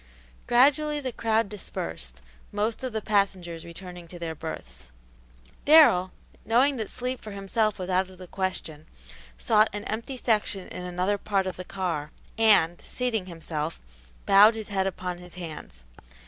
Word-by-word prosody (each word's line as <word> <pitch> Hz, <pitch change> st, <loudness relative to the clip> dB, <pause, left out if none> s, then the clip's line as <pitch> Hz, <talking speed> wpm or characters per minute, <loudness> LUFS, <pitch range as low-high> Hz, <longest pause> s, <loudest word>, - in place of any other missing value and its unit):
Gradually 295 Hz, +5 st, +4 dB
the 260 Hz, -3 st, -3 dB
crowd 225 Hz, -1 st, +1 dB
dispersed, 75 Hz, -, -6 dB, 0.3 s
most 215 Hz, +4 st, -1 dB
of 255 Hz, -, -2 dB
the 220 Hz, -1 st, -3 dB
passengers 185 Hz, -5 st, 0 dB
returning 175 Hz, 0 st, -10 dB
to 175 Hz, -, -10 dB
their 165 Hz, -1 st, -4 dB
berths. 65 Hz, -, -8 dB, 0.7 s
Darrell, 285 Hz, -, +7 dB, 0.3 s
knowing 260 Hz, +4 st, +3 dB
that 220 Hz, -3 st, -3 dB
sleep 255 Hz, 0 st, -4 dB
for 215 Hz, -, -8 dB
himself 210 Hz, +2 st, 0 dB
was 185 Hz, -, -5 dB
out 185 Hz, 0 st, +1 dB
of 185 Hz, -, -14 dB
the 185 Hz, -, -9 dB
question, 180 Hz, -5 st, -4 dB, 0.5 s
sought 210 Hz, -, +4 dB
an 205 Hz, 0 st, -4 dB
empty 230 Hz, +5 st, -4 dB
section 210 Hz, -5 st, 0 dB
in 180 Hz, -, -6 dB
another 180 Hz, +3 st, -1 dB
part 195 Hz, -2 st, 0 dB
of 185 Hz, -, -3 dB
the 185 Hz, -, -6 dB
car, 175 Hz, -6 st, -3 dB, 0.3 s
and, 205 Hz, -7 st, +4 dB
seating 225 Hz, -7 st, -2 dB
himself, 165 Hz, -2 st, -4 dB, 0.5 s
bowed 205 Hz, +3 st, +7 dB
his 220 Hz, -1 st, -6 dB
head 195 Hz, -1 st, +1 dB
upon 180 Hz, -1 st, -4 dB
his 180 Hz, -1 st, -13 dB
hands. 155 Hz, -, -8 dB
190 Hz, 155 wpm, -27 LUFS, 175-220 Hz, 0.7 s, Darrell